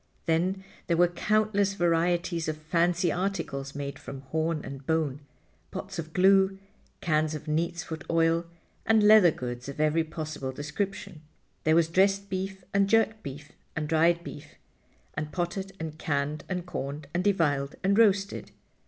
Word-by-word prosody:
Then 180 +4 +1 0.2
there 170 - +2
were 175 +1 +6
countless 205 +1 +1
varieties 170 -1 +1
of 155 -1 -2
fancy 170 +2 +1
articles 155 -7 -3
made 140 -1 -5
from 135 -1 -8
horn 155 +3 -2
and 135 0 -8
bone, 150 -2 0 0.5
pots - - -6
of 160 -1 -5
glue, 190 +2 +4 0.4
cans 155 -1 +1
of 150 - -6
neatsfoot 160 0 -2
oil, 165 0 +2 0.4
and 220 -1 +4
leather 210 -4 +8
goods 125 -3 -5
of 140 - -8
every 155 +2 +3
possible 155 -4 -5
description. 150 +3 -4 0.4
There 155 0 +5
was 165 -1 +4
dressed 195 +3 +2
beef, 190 0 -3
and 200 0 +3
jerked 220 0 +3
beef, 145 0 -8 0.2
and 155 -2 -2
dried 165 +2 +3
beef, 150 -2 -10 0.6
and 155 0 -4
potted 190 +2 -3
and 160 -1 -6
canned 145 0 -1
and 180 -2 -3
corned 145 -3 -5
and 175 +1 0
deviled 150 -8 +1
and 195 +1 +3
roasted. 200 -2 +2
165 Hz, 150 wpm, -28 LUFS, 150-190 Hz, 0.6 s, leather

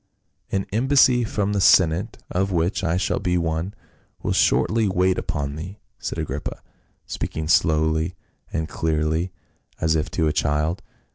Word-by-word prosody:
" - - -41
An 95 -1 0
embassy 125 +1 +4
from 105 -2 -1
the 100 - +1
senate 90 +4 +4
— - - -20
of 95 0 0
which 90 +2 0
I 85 0 +1
shall 95 - 0
be 90 0 0
one 85 +4 -2 0.2
— - - -35
will - - 0
shortly 110 -2 +3
wait 95 0 +2
upon 75 -5 -3
thee," 95 +6 -7 0.2
said - - -4
Agrippa, 70 +3 -4 0.4
speaking 80 -1 -4
slowly 80 0 +2 0.4
and 80 -1 -2
clearly 80 +3 -1 0.5
as 80 0 +2
if 75 - -1
to 80 -3 0
a 75 - +1
child. 75 +4 0
85 Hz, 160 wpm, -23 LUFS, 80-95 Hz, 0.5 s, embassy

